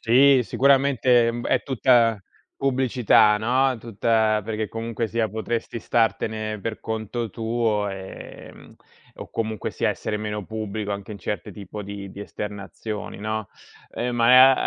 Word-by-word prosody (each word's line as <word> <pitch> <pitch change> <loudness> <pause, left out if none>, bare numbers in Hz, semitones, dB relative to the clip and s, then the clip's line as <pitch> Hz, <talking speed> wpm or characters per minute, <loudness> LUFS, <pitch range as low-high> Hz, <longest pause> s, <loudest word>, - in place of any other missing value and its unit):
Sì, 130 +3 +5
sicuramente, 130 -2 +3
ehm, 120 +1 -2
è - - +2
tutta 120 -4 +3 0.4
pubblicità, 125 -5 +3
no, 130 +4 +2
tutta 110 -1 +1
perché 110 -1 -3
comunque 115 0 -3
sia 115 0 0
potresti 115 +2 -3
startene 110 +1 0
per 110 +1 -4
conto 110 +1 -4
tuo, 110 -2 0
ehm, 95 -1 -10 0.4
o - - -10
comunque 110 -2 -3
sia - - 0
essere 105 - -2
meno 105 -1 -4
pubblico 110 0 -4
anche 100 +1 -6
in 100 - -7
certe 105 +3 -4
tipo 105 0 -8
di 100 -1 -7
di 100 - -10
esternazioni, 105 +1 -6
no. 110 0 -3 0.5
Ehm, 120 +1 -2
ma, 125 +3 +6
110 Hz, 135 wpm, -24 LUFS, 105-120 Hz, 0.5 s, ma